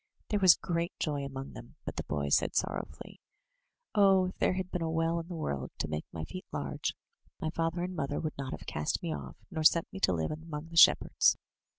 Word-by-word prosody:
There 210 - +1
was 185 -3 +8
great 170 +1 -2
joy 145 -3 -1
among 135 0 -6
them, - - -11
but - - -4
the - - -3
boy 70 -1 -2
said - - +2
sorrowfully: - - -3 0.7
"Oh! 195 -2 +5
if - - -12
there - - +3
had 185 0 -3
been 180 - -2
a 165 - 0
well 165 +1 +1
in 165 - -7
the 175 - -6
world 70 - -3
to - - -2
make 75 0 -3
my 80 - -5
feet 185 - -8
large, - - -3 0.4
my 155 - -2
father 165 +1 -1
and 185 0 -4
mother 145 -2 -2
would 155 -1 -3
not 135 -1 -4
have - - -7
cast 75 +1 -2
me 80 - -1
off, 70 0 -8
nor 160 -3 -2
sent 165 +1 +4
me 195 - -5
to 185 - +3
live 80 -3 -1
among 155 0 -6
the 165 - -10
shepherds.'' 165 - +6
160 Hz, 225 wpm, -31 LUFS, 135-175 Hz, 0.7 s, was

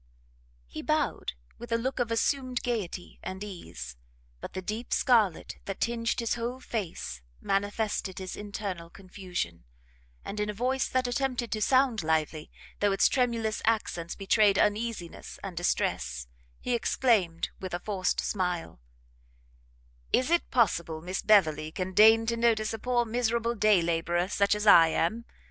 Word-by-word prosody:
He - - -7
bowed - - -1 0.3
with 240 0 -9
a 230 - +3
look 260 +3 -3
of 240 -2 0
assumed 255 +2 0
gaiety 205 -7 -4
and 190 +1 -6
ease, 170 - -8 0.4
but - - -8
the 185 - -4
deep 220 +5 -4
scarlet 220 - +2
that 195 - -5
tinged 230 0 0
his 230 -1 0
whole 240 +2 -3
face 195 - -5 0.2
manifested 205 -1 -1
his 185 -1 -5
internal 200 -5 -5
confusion; 180 - -6 0.6
and 210 - -5
in 210 0 -1
a 210 - -4
voice 255 +4 0
that 255 0 +1
attempted 245 -1 -1
to 215 - -2
sound 255 -2 +3
lively, 155 -1 -1 0.3
though 205 -1 +3
its 195 - +4
tremulous 230 -4 0
accents 205 -7 -1
betrayed 200 0 +3
uneasiness 210 -4 -1
and 195 -3 -6
distress, 65 - -1 0.3
he 250 - -2
exclaimed, 220 -8 +1
with 185 -2 -4
a - - -3
forced 190 -2 -1
smile, 180 - -2 1.3
"Is 260 +5 +2
it 345 - +2
possible 170 -9 +1
Miss 185 +2 -3
Beverley 155 -7 +3
can 185 +2 -4
deign 220 +3 +7
to 230 +1 0
notice 225 -2 +2
a 225 - -4
poor 245 +1 +1
miserable 235 0 0
day 210 -5 +4
labourer 170 +1 0
such 200 0 +2
as 210 0 -3
I 165 -5 +8
am? 195 +8 0
210 Hz, 150 wpm, -28 LUFS, 180-235 Hz, 1.3 s, I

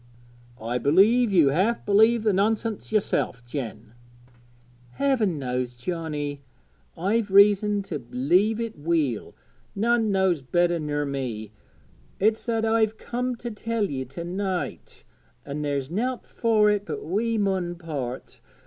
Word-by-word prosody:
'I 120 +3 -2
believe 205 - +4
you 165 -7 +5
half 195 +11 +1
believe 220 +3 +4
the 215 -2 +2
nonsense 215 +3 0
yourself, 160 - 0
Jen.' 115 -4 -6 1.0
'Heaven 235 - +1
knows, 125 -2 -3
Johnnie, 145 0 -4 0.6
I've 205 +5 0
reason 205 +1 +5
to 150 - -5
b'lieve 175 - +1
it 230 -8 -5
weel, 150 -7 -1 0.4
none 225 +1 +2
knows 190 -5 +2
better 175 +5 +1
ner 145 -1 -2
me. 125 -7 -4 0.7
It's 215 +3 +2
that 225 -1 0
I've 220 -1 +2
comed 250 +1 -3
to 240 - -4
tell 225 +1 -2
ye 130 -1 -3
to 135 +7 -8
night; 185 +1 -4 0.4
an' 145 +1 -4
there's 140 -1 -2
nowt 245 +7 -2
fur 215 -2 +2
it 205 -1 0
but 150 -3 -5
we 220 +7 0
mun 190 -4 0
part. 145 -7 -6
185 Hz, 130 wpm, -25 LUFS, 145-220 Hz, 1.0 s, you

